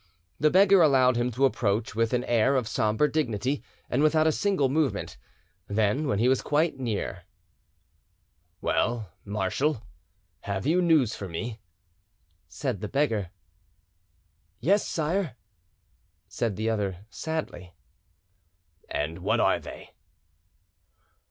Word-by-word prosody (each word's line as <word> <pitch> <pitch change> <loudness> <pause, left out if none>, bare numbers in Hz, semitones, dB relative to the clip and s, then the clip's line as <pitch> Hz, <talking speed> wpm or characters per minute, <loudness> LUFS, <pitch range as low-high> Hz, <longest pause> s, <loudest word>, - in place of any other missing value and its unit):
The 150 - +4
beggar 195 +2 +6
allowed 130 -5 +5
him 120 +1 0
to 135 +4 +3
approach 110 -4 0
with 115 +1 0
an 125 0 0
air 120 +3 +2
of 125 -4 0
sombre 110 +5 +1
dignity 135 -2 -1 0.3
and 125 - 0
without 155 +1 +4
a 160 - +4
single 190 -4 +1
movement; 140 -5 -1 0.5
then, 110 +8 +1
when 115 - 0
he 115 +4 +2
was 130 0 +3
quite 150 -1 0
near— 115 -6 -3 1.4
"Well, 110 -5 0
marshal, 105 +7 -1 0.6
have, 100 +1 -4
you 170 +5 +3
news 160 -10 +3
for 100 - -6
me?" 110 +7 -5 0.9
said 95 - -4
the 105 - -3
beggar. 115 - 0 1.3
"Yes, 195 - +2
sire," 165 - -1 0.9
said 115 -4 -2
the 110 +3 -2
other 100 -4 -2
sadly. 90 - -5 1.1
"And 80 +4 -3
what - - +1
are - - +3
they?" - - -11
125 Hz, 120 wpm, -27 LUFS, 105-150 Hz, 1.4 s, beggar